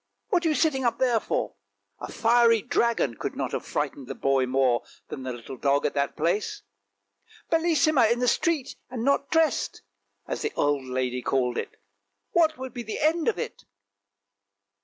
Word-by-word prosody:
what 360 -5 +2
are 325 - +2
you 305 - +1
sitting 295 -5 +1
up 240 -2 +1
there 245 -3 +2
for? - - -2 0.2
" - - -50
A - - -7
fiery 230 -1 +4
dragon 235 - +1
could - - -4
not - - -3
have - - -3
frightened 135 -3 -3
the - - -5
boy 135 -1 +1
more 130 -2 +2 0.3
than 135 - -6
the 130 0 -4
little 120 +2 -8
dog 140 +2 +1
at - - 0
that 140 0 -1
place. 175 +6 -1 0.4
" 100 0 -28
Bellissima 310 -7 +3
in 235 - +2
the 250 0 0
street 300 +1 0
and 250 -3 -4
not 280 +1 +1
dressed! 320 -1 +1 0.2
" - - -45
as - - -3
the 435 - -2
old 145 -2 +1
lady 125 -1 -2
called 125 -2 0
it, - - -7 0.3
" 100 0 -53
what 320 -2 +3
would 260 -2 -7
be 245 - -5
the 220 -2 -5
end 315 +2 +2
of 460 - +2
it? 475 0 -5
230 Hz, 195 wpm, -26 LUFS, -, 0.4 s, fiery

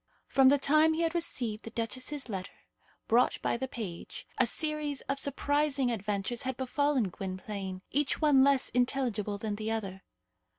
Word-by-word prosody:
From 270 -1 +5
the 285 - +5
time 310 +3 +4
he 330 - -1
had 330 0 0
received 245 -10 -2
the - - -7
duchess's 255 +5 -2
letter, 195 -4 -7 0.4
brought 240 +2 +3
by - - +1
the 265 +3 -3
page, 205 -9 -7
a - - +5
series 305 -3 0
of 275 0 -3
surprising 285 -2 +1
adventures 210 +2 -2
had 260 -2 -3
befallen 265 -3 +1
Gwynplaine, 190 0 -5
each 290 +1 0
one 290 -4 +5
less 275 -1 +4
intelligible 245 -5 0
than 205 0 -3
the 215 +1 -3
other. 195 -4 -3
250 Hz, 160 wpm, -30 LUFS, 210-285 Hz, 0.4 s, From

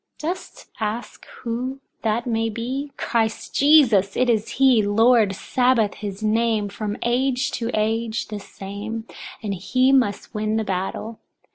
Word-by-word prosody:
Dost 345 +5 -6
ask 220 +2 -4 0.2
who 250 +3 -3 0.2
that 225 +1 0
may 225 -2 0
be? 255 +6 -4
Christ 225 -2 -1
Jesus, 255 -10 +5
it 250 -1 +3
is 220 -2 -1
he; 260 -4 +5
Lord 215 0 +4
Sabbaoth, 245 -2 +2
his 205 0 -6
name, 220 -1 +1
from 210 +1 -4
age 255 +2 +1
to 230 -1 -3
age 220 +1 -1
the 210 -1 -5
same, 205 +3 -7 0.4
and 205 -2 -2
he 255 +8 +2
must 240 -7 +1
win 215 0 -1
the 220 - +1
battle. 195 +3 -4
225 Hz, 140 wpm, -23 LUFS, 210-245 Hz, 0.4 s, Jesus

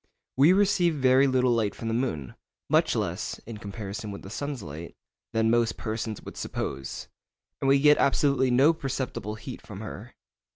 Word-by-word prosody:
We 140 +6 +6
receive 185 -4 +3
very 130 0 +4
little 130 -1 +3
light 110 -3 +1
from 115 - -6
the 115 - -1
moon, 95 - -2 0.4
much - - +3
less - - -2
(in 110 -2 -8
comparison 100 0 -6
with 100 - -7
the 95 - -9
sun's 140 0 -4
light) 80 +2 -8 0.4
than 110 0 +2
most 115 -1 +2
persons 110 -1 -4
would - - -9
suppose, 65 -1 -4 0.5
and 135 - 0
we 135 +1 +5
get 150 +1 +6
absolutely 140 -2 +3
no 135 +6 +5
perceptible 130 -7 -4
heat 125 +4 -8
from 105 -2 -9
her. 110 +2 -8
120 Hz, 170 wpm, -27 LUFS, 105-135 Hz, 0.5 s, We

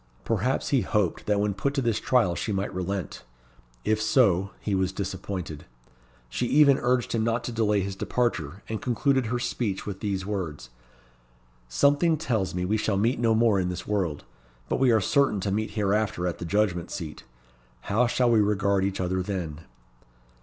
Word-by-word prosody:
Perhaps 115 +4 0
he 135 -4 +3
hoped 105 -7 -1
that 105 -1 +2
when 105 0 +1
put 140 +9 -2
to 135 - +1
this 115 -3 +1
trial 120 -9 +2
she 105 - -3
might 100 0 -2
relent. 95 +1 -4 0.6
If 110 0 +1
so, 110 -4 +3
he 105 - -3
was 95 -1 +1
disappointed. 95 -4 -5 0.6
She 120 - -2
even 140 -1 +5
urged 125 0 +1
him 115 -1 +1
not 115 +1 0
to - - -4
delay 105 -3 +1
his 95 0 -4
departure, 95 -7 -2
and 110 -1 -4
concluded 130 0 +1
her 120 +2 -1
speech 120 -5 -2
with 100 -2 -5
these 95 -3 -2
words 95 -11 -4 1.0
"Something 145 - +3
tells 110 - -1
me 90 0 -1
we 105 +4 +1
shall 105 -2 0
meet 115 +6 +1
no 115 -2 +3
more 110 -3 +3
in 90 -1 0
this 90 - -5
world. 95 -8 -1 0.5
But - - 0
we 130 -1 +4
are 110 -2 +4
certain 135 0 +2
to 100 - -1
meet 110 +2 -1
hereafter 100 -3 0
at 90 - -2
the 85 - -5
Judgment 90 -2 0
Seat. 80 -5 -6 0.6
How 120 +5 +1
shall 125 0 +2
we 110 -2 +5
regard 100 -1 +1
each 100 0 -1
other 95 0 0
then?" 90 -6 -4
105 Hz, 180 wpm, -26 LUFS, 95-115 Hz, 1.0 s, even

